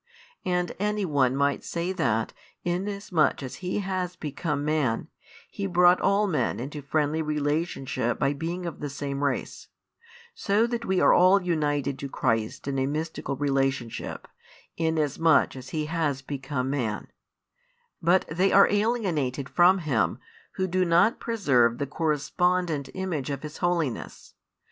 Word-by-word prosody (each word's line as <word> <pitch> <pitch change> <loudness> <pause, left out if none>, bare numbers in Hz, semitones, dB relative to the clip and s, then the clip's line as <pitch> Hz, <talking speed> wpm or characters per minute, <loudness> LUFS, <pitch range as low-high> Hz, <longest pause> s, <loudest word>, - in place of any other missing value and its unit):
And 180 -1 0
any 210 0 0
one 135 -5 +2
might 140 0 +1
say 170 +2 -2
that, 115 - 0 0.3
inasmuch 180 -4 0
as 130 - -6
He 185 +2 -2
has 185 -2 -3
become 150 -1 -3
Man, 150 -7 0 0.4
He 200 - -3
brought 180 0 +5
all 200 +2 +3
men 150 - 0
into 145 +4 -5
friendly 150 +2 0
relationship 145 -5 -1
by 135 +1 +1
being 170 +5 -4
of 170 - -5
the 145 - -4
same 140 0 -4
race; 140 -2 -2 0.7
so 220 - +2
that 235 0 -3
we 190 -1 +1
are - - +6
all 185 +3 +6
united 145 -5 0
to 140 - -5
Christ 115 -1 -1
in 135 -1 -1
a 130 - +1
mystical 155 -1 -3
relationship, 135 -3 -2 0.5
inasmuch 160 -2 +2
as 130 -1 -9
He 155 +1 -2
has 150 -4 -1
become 135 -1 -3
Man: 115 -7 -2 0.9
but 175 +3 +3
they 180 +5 +1
are 200 - +7
alienated 185 - 0
from 180 +2 +5
Him, 125 - 0 0.4
who 190 - -1
do 185 0 +1
not 175 +5 +3
preserve 130 - +2
the 140 - -1
correspondent 160 +1 0
image 175 -8 -3
of 140 0 -4
His 150 0 -7
holiness. 170 -8 -2
155 Hz, 145 wpm, -26 LUFS, 140-180 Hz, 0.9 s, are